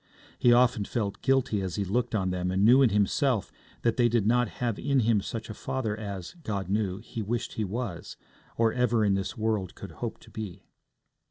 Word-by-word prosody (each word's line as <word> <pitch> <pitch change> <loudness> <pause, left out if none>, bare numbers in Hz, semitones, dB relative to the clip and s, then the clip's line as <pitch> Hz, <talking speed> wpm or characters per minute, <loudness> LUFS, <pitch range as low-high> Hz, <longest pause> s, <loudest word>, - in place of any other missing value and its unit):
He 120 - +5
often 120 -2 +4
felt 100 -1 -3
guilty 130 -6 +2
as 95 -2 -3
he 100 - -1
looked 115 +4 0
on 95 -3 0
them 90 0 -1
and 95 +2 +2
knew 125 +4 +7
in 130 - +6
himself 105 +3 +1 0.3
that 115 -2 +2
they 120 -1 +4
did 115 -3 +1
not 120 +2 +3
have 120 -4 -1
in 140 -2 +2
him 110 -2 +3
such 110 +3 -5
a 110 - -6
father 110 -1 -3
as, 100 -4 -6
God 100 - -3
knew, 100 -2 0
he 110 +1 -6
wished 115 +3 -2
he 110 - -2
was, 105 -3 -4 0.4
or 115 -1 +3
ever 120 -3 +2
in 100 - +3
this 95 +5 -2
world 110 -4 -1
could - - -9
hope - - -5
to - - -16
be. 105 -5 -7
110 Hz, 205 wpm, -28 LUFS, 100-120 Hz, 0.4 s, knew